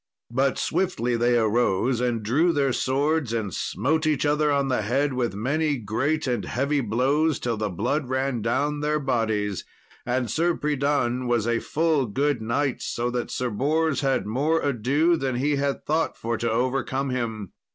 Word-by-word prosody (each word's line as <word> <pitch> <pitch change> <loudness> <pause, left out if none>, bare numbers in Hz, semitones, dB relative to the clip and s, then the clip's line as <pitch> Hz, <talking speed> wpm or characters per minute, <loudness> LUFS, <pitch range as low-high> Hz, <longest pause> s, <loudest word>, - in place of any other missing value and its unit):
But 135 +2 +1
swiftly 125 -11 0
they 120 +1 +2
arose, 120 +1 +1
and 120 -3 0
drew 150 +11 +3
their 140 -3 +1
swords, 140 0 0
and 105 -6 -2
smote 160 +1 0
each 150 -2 +1
other 150 0 +2
on 140 -1 +1
the 130 -4 +1
head 135 +6 0
with 120 -5 -1
many 145 +7 0
great 130 +8 -1
and 120 -5 -1
heavy 140 +3 0
blows, 135 +7 +1
till 120 -1 -2
the 105 -1 -2
blood 125 - -1
ran 130 -2 -1
down 145 +7 0
their 150 +1 0
bodies; 110 -7 -1 0.4
and 125 0 -1
Sir 170 +1 +1
Pridan 140 -4 0
was 120 -3 +1
a 115 0 +1
full 155 -4 +1
good 140 +3 0
knight, 125 +4 -1
so 120 +1 -2
that 120 -1 -3
Sir 125 -1 -2
Bors 155 +7 +1
had 135 -2 +1
more 145 +9 +1
ado 145 +6 +2
than 135 -3 -2
he 140 +3 +1
had 140 0 -2
thought 160 +2 0
for 115 +1 -2
to 115 +1 -1
overcome 130 +3 -1
him. 110 -6 -3
130 Hz, 170 wpm, -25 LUFS, 120-145 Hz, 0.4 s, drew